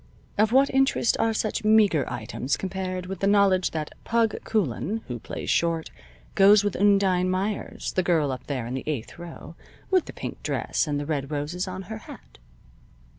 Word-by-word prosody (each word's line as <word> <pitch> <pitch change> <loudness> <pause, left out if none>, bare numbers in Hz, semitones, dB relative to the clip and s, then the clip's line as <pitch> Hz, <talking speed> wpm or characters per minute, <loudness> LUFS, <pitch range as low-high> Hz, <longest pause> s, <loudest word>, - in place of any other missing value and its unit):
Of 215 +1 +3
what 270 +2 +4
interest 270 -3 +2
are 225 - +2
such 215 -1 -2
meager 215 -8 +4
items 125 +3 -3
compared 185 -1 -4
with 190 0 -6
the 195 - +1
knowledge 200 -2 +4
that 155 -2 -4
"Pug" 230 -2 0
Coulan, 210 - -1
who 120 -3 -5
plays - - -4
short, 165 -1 0 0.4
goes 200 +1 +6
with 205 -2 -1
Undine 195 -2 +3
Meyers, 195 +3 -2
the 185 - +2
girl 165 -6 +1
up 130 - -7
there 130 -5 -3
in 120 - -5
the 130 - -3
eighth 140 -1 -4
row, 170 -1 -9 0.4
with 370 -3 +3
the - - -9
pink - - -7
dress - - -1
and 145 -1 -1
the 145 - -4
red 140 -3 -2
roses 155 +6 -3
on 185 +1 -5
her 220 +4 -7
hat? - - -13
185 Hz, 180 wpm, -25 LUFS, 150-205 Hz, 0.4 s, goes